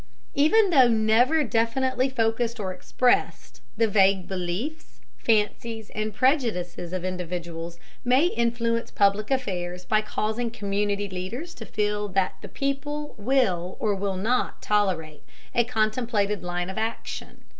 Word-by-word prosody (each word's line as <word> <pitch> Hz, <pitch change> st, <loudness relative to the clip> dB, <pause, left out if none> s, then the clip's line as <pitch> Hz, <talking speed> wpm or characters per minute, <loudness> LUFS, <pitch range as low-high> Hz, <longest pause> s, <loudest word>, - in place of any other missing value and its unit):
Even 375 Hz, +8 st, +4 dB
though 265 Hz, -6 st, +7 dB
never 235 Hz, +7 st, +3 dB
definitely 255 Hz, +2 st, +1 dB
focused 230 Hz, -1 st, 0 dB
or 190 Hz, -3 st, -2 dB
expressed, 245 Hz, +7 st, 0 dB, 0.2 s
the 225 Hz, 0 st, +4 dB
vague 195 Hz, -3 st, +3 dB
beliefs, 190 Hz, -, -4 dB, 0.2 s
fancies, 220 Hz, 0 st, 0 dB
and 215 Hz, 0 st, -2 dB
prejudices 210 Hz, -, 0 dB
of 185 Hz, -1 st, -3 dB
individuals 170 Hz, -2 st, -5 dB, 0.3 s
may 255 Hz, +6 st, +4 dB
influence 235 Hz, -5 st, 0 dB
public 205 Hz, +1 st, +2 dB
affairs 180 Hz, -9 st, -2 dB
by 215 Hz, 0 st, +2 dB
causing 220 Hz, +2 st, -2 dB
community 205 Hz, -2 st, -1 dB
leaders 195 Hz, -, -5 dB
to 225 Hz, -, -9 dB
feel 210 Hz, 0 st, -1 dB
that 195 Hz, -1 st, 0 dB
"the -, -, -8 dB
people" 290 Hz, +2 st, -3 dB
will 200 Hz, -7 st, +1 dB
or 210 Hz, -2 st, +1 dB
will 195 Hz, -1 st, -2 dB
not 230 Hz, +7 st, 0 dB
tolerate 180 Hz, -8 st, 0 dB, 0.3 s
a 240 Hz, -, +4 dB
contemplated 215 Hz, -3 st, 0 dB
line 175 Hz, +1 st, -3 dB
of 190 Hz, -, -4 dB
action. 225 Hz, +1 st, -5 dB
215 Hz, 130 wpm, -26 LUFS, 190-245 Hz, 0.3 s, though